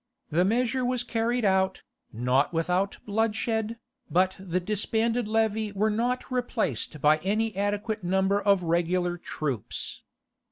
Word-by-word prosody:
The 170 +4 +3
measure 245 +5 +1
was 250 0 0
carried 235 0 0
out, 190 -1 +2 0.3
not 125 +5 +1
without 180 +4 0
bloodshed, 220 +1 0 0.3
but 185 +2 +2
the 185 -1 -1
disbanded 220 +4 0
levy 220 -1 +1
were 215 +2 +1
not 245 +4 -1
replaced 215 - -1
by 150 +1 +5
any 210 +4 0
adequate 205 +1 -1
number 190 +3 +2
of 200 -2 +3
regular 175 +1 0
troops. 140 - -4
205 Hz, 125 wpm, -27 LUFS, 180-225 Hz, 0.3 s, by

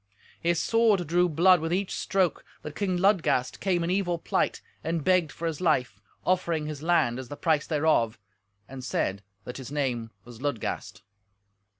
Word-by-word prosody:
His 170 -1 +1
sword 225 -4 +3
drew 175 +3 +2
blood 175 +3 +5
with 165 +1 -2
each 190 +2 0
stroke, 190 -4 0 0.2
that 150 - -7
King 190 -3 0
Ludgast 175 -9 +2
came 180 -3 +1
in 170 - -1
evil 185 -3 0
plight, - - 0 0.2
and 165 -1 -1
begged 180 -4 +3
for 170 - -6
his 165 -1 -2
life, 125 - +1 0.2
offering 170 -4 +1
his 150 -2 -6
land 155 -7 +2
as 130 - -7
the 145 - -8
price 155 -3 +1
thereof, 150 -8 +2 0.5
and 130 -1 -9
said 100 -5 -1 0.2
that 125 - -7
his 135 0 -8
name 125 -6 -1 0.2
was 120 0 -12
Ludgast. 140 -9 -3
160 Hz, 170 wpm, -27 LUFS, 135-180 Hz, 0.5 s, blood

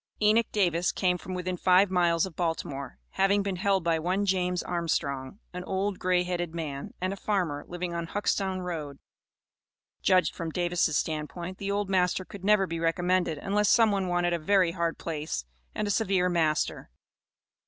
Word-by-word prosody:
Enoch 215 +2 +4
Davis 180 -4 +2
came 180 -2 +1
from 185 +1 -6
within 180 0 -2
five 185 +2 +4
miles 170 -2 +3
of 185 -4 -9
Baltimore, 150 -5 -3
having 195 +1 +2
been 195 -2 -2
held 195 -1 +1
by 165 -1 +1
one 185 +5 0
James 180 -2 0
Armstrong, 145 -4 -2 0.2
"an 180 0 -5
old 195 0 -1
grey 180 -1 +2
headed 175 -2 -3
man," 145 -4 -5
and 185 +1 -1
a - - -4
farmer, 180 -8 -1
living 175 0 -4
on 170 -1 -3
Huxtown 190 -1 -1
Road. 155 -6 -5 1.0
Judged 185 -1 +3
from 165 -2 -4
Davis' 175 -2 +1
stand 155 -2 -2
point, 180 +1 -7
the 200 - -3
old 200 0 0
master 185 -1 +1
could 200 -1 -11
never 205 -1 +4
be 165 -2 -4
recommended, 175 0 +1
unless 205 +6 +1
some 225 -2 +5
one 195 -2 0
wanted 175 0 +1
a 170 - 0
very 185 +1 +3
hard 170 -1 -1
place 150 - -4 0.3
and 210 - -1
a - - +1
severe 190 -4 +2
master. 160 -3 0
180 Hz, 175 wpm, -28 LUFS, 165-195 Hz, 1.0 s, some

